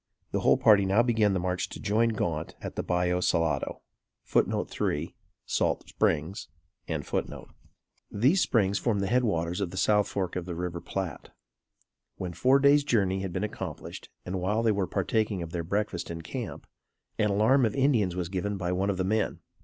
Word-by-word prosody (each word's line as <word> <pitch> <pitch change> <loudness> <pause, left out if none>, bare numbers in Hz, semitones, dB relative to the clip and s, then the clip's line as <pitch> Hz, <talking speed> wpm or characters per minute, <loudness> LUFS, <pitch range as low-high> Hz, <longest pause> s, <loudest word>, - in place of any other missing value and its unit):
The - - 0
whole - - +4
party 105 -2 +6
now 100 +5 +3
began 110 -4 +2
the 95 - 0
march 90 0 -2
to - - -8
join 110 +2 +2
Gaunt 85 -7 -2
at - - -7
the - - -1
Ballo 90 0 0
Salado. 80 -6 0 0.4
[Footnote - - +1
3: 75 +3 -2 0.3
Salt - - 0
Springs.] 80 +7 0 1.6
These 135 - +3
Springs 100 -4 +2
form 115 -4 0
the 100 - 0
head 125 +5 +2
waters 85 -4 -1
of 95 - -1
the 95 - -8
south 105 +1 +3
fork 95 -3 -3
of 90 -2 -3
the 90 -2 -5
River 85 0 -4
Platte. 95 -6 -5 0.9
When 90 -2 -5
four 130 +9 +4
days' 140 +1 +5
journey 100 -8 +1
had 95 -2 -3
been - - -2
accomplished, - - -6 0.2
and 90 0 -3
while 105 +5 0
they 115 - +4
were 100 -3 0
partaking 100 0 0
of 80 - -8
their 85 -1 -3
breakfast 100 -1 -2
in 85 -1 -6
camp, - - -6 0.5
an 105 - +3
alarm 110 +7 +4
of 110 -3 +1
Indians 120 -10 +2
was 90 -2 -2
given 100 +3 -2
by 90 -1 -2
one 95 +2 0
of 100 - 0
the 95 - 0
men. 110 +3 0
95 Hz, 185 wpm, -28 LUFS, 90-110 Hz, 1.6 s, party